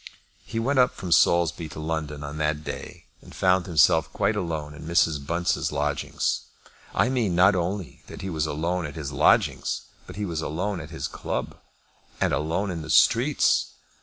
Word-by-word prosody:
He 115 Hz, -, -6 dB
went 130 Hz, +4 st, +1 dB
up 125 Hz, 0 st, +4 dB
from 90 Hz, -, -6 dB
Saulsby 85 Hz, -2 st, +3 dB
to 75 Hz, -, -9 dB
London 75 Hz, -2 st, -3 dB
on 75 Hz, +2 st, -6 dB
that 75 Hz, 0 st, 0 dB
day, -, -, -7 dB, 0.2 s
and -, -, -14 dB
found 95 Hz, -1 st, +2 dB
himself 80 Hz, -2 st, +4 dB
quite -, -, 0 dB
alone 80 Hz, -4 st, -3 dB
in 75 Hz, +1 st, -10 dB
Mrs. 80 Hz, -4 st, +2 dB
Bunce's 85 Hz, +4 st, 0 dB
lodgings. 75 Hz, -1 st, -1 dB, 0.5 s
I -, -, +3 dB
mean 120 Hz, -8 st, 0 dB
not 95 Hz, +3 st, +6 dB
only 90 Hz, 0 st, -3 dB
that -, -, -9 dB
he 95 Hz, -, -3 dB
was 80 Hz, -1 st, -1 dB
alone 85 Hz, +3 st, -1 dB
at 75 Hz, -, -10 dB
his 75 Hz, -3 st, -5 dB
lodgings, -, -, +2 dB, 0.3 s
but -, -, -9 dB
he 105 Hz, +1 st, -3 dB
was 85 Hz, -4 st, -3 dB
alone 90 Hz, +5 st, -2 dB
at 75 Hz, -, -9 dB
his 80 Hz, -, -4 dB
club, -, -, -4 dB, 0.6 s
and -, -, +1 dB
alone 85 Hz, +6 st, -1 dB
in 85 Hz, -2 st, -4 dB
the 80 Hz, -, -8 dB
streets. -, -, +3 dB
80 Hz, 180 wpm, -25 LUFS, 75-90 Hz, 0.6 s, not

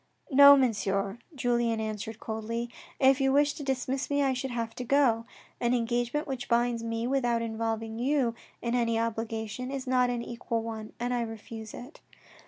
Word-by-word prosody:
" -, -, -27 dB
No, 280 Hz, +1 st, +9 dB
Monsieur," 200 Hz, -4 st, 0 dB, 0.2 s
Julien 240 Hz, -3 st, +1 dB
answered 220 Hz, 0 st, -4 dB
coldly, 230 Hz, +2 st, -4 dB
" -, -, -24 dB
if 270 Hz, +1 st, +3 dB
you 270 Hz, 0 st, +3 dB
wished 290 Hz, +2 st, +3 dB
to 295 Hz, -, -5 dB
dismiss 265 Hz, 0 st, -1 dB
me, 285 Hz, 0 st, +2 dB
I 270 Hz, -1 st, +2 dB
should 260 Hz, +1 st, -3 dB
have 230 Hz, -2 st, -3 dB
to 250 Hz, -, -3 dB
go. 245 Hz, -3 st, +3 dB, 0.3 s
An 240 Hz, +1 st, +2 dB
engagement 240 Hz, +5 st, 0 dB
which 265 Hz, -4 st, -5 dB
binds 235 Hz, 0 st, +2 dB
me 230 Hz, 0 st, -2 dB
without 245 Hz, -3 st, +1 dB
involving 225 Hz, 0 st, -3 dB
you 260 Hz, -2 st, +1 dB, 0.3 s
in 235 Hz, 0 st, -1 dB
any 230 Hz, -2 st, +2 dB
obligation 225 Hz, +1 st, -3 dB
is 275 Hz, -1 st, -4 dB
not 250 Hz, -1 st, +3 dB
an 240 Hz, -1 st, -2 dB
equal 235 Hz, -1 st, -3 dB
one 220 Hz, -1 st, -6 dB
and 245 Hz, +1 st, -1 dB
I 245 Hz, -, 0 dB
refuse 225 Hz, -1 st, -7 dB
it." 260 Hz, +6 st, -11 dB
235 Hz, 185 wpm, -29 LUFS, 225-260 Hz, 0.3 s, No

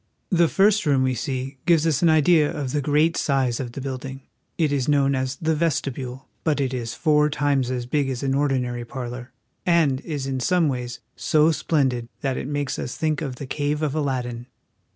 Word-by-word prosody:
The 170 Hz, -2 st, +4 dB
first 200 Hz, +1 st, +3 dB
room 135 Hz, -2 st, +3 dB
we 130 Hz, -1 st, +1 dB
see 130 Hz, +2 st, -4 dB
gives 165 Hz, -2 st, +4 dB
us 155 Hz, -4 st, +1 dB
an 170 Hz, -, +5 dB
idea 155 Hz, -1 st, +4 dB
of 145 Hz, -6 st, -4 dB
the 145 Hz, -, 0 dB
great 150 Hz, +4 st, +2 dB
size 130 Hz, -4 st, +1 dB
of 120 Hz, -3 st, -5 dB
the 135 Hz, -, -6 dB
building. 135 Hz, 0 st, -5 dB, 0.4 s
It 155 Hz, -4 st, +2 dB
is 140 Hz, -1 st, 0 dB
known 140 Hz, -1 st, +3 dB
as 130 Hz, 0 st, -1 dB
the 160 Hz, +3 st, 0 dB
Vestibule; 135 Hz, -5 st, -2 dB, 0.2 s
but 155 Hz, -3 st, +1 dB
it 135 Hz, -2 st, 0 dB
is 115 Hz, -2 st, -4 dB
four 150 Hz, -1 st, +3 dB
times 140 Hz, -3 st, +1 dB
as 125 Hz, -1 st, -2 dB
big 140 Hz, +2 st, 0 dB
as 130 Hz, 0 st, -3 dB
an 135 Hz, -1 st, +1 dB
ordinary 130 Hz, -4 st, 0 dB
parlor, 125 Hz, 0 st, -7 dB, 0.3 s
and 160 Hz, -6 st, +2 dB
is 145 Hz, -5 st, -4 dB
in 135 Hz, -1 st, -2 dB
some 175 Hz, +4 st, +2 dB
ways 125 Hz, -2 st, -4 dB
so 155 Hz, +1 st, +3 dB
splendid 130 Hz, -7 st, 0 dB
that 135 Hz, -2 st, -1 dB
it -, -, -4 dB
makes 145 Hz, -1 st, -2 dB
us 125 Hz, -, -5 dB
think 155 Hz, 0 st, 0 dB
of 135 Hz, -5 st, -4 dB
the 140 Hz, -, -7 dB
cave 145 Hz, +3 st, -2 dB
of 145 Hz, -3 st, 0 dB
Aladdin. 125 Hz, -5 st, -2 dB
140 Hz, 200 wpm, -23 LUFS, 130-150 Hz, 0.4 s, an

